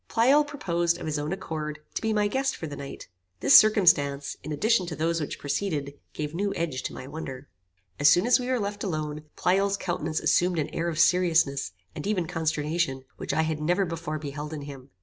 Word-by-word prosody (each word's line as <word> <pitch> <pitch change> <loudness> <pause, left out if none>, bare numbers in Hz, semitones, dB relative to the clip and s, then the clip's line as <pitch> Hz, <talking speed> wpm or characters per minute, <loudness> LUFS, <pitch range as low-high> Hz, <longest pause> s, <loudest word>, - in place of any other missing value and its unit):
Pleyel 265 +6 +4
proposed, 175 - -1
of - - -7
his 155 -1 -1
own 150 +2 -3
accord, 155 -5 -4 0.2
to - - -3
be 220 - 0
my 210 -1 +2
guest 270 +5 0
for - - -6
the 145 -2 -6
night. 140 -1 -8 0.3
This 130 - +9
circumstance, 155 -10 +3
in 155 - -7
addition 195 +4 +2
to 165 - -4
those 165 +1 0
which 150 - -4
preceded, 145 -1 -2 0.2
gave 150 0 -4
new 200 +4 -1
edge 155 -6 -2
to - - -3
my 130 - -7
wonder. 135 -2 -7 0.5
As 145 0 +6
soon 175 +7 +4
as 250 +2 +5
we 250 - -4
were 255 -1 +1
left 205 0 -3
alone, 155 -5 -3
Pleyel's 195 +2 +2
countenance 160 -4 -2
assumed 180 0 +2
an 150 - -1
air 170 +1 -2
of 160 - -4
seriousness, 165 - +3 0.2
and - - -5
even 195 -5 0
consternation, 160 -4 -1
which - - -4
I 160 - +2
had 160 -1 -2
never 175 +5 +2
before 165 -2 -4
beheld 150 +1 -6
in 150 -2 -5
him. 140 -2 -10
165 Hz, 210 wpm, -27 LUFS, 150-190 Hz, 0.5 s, This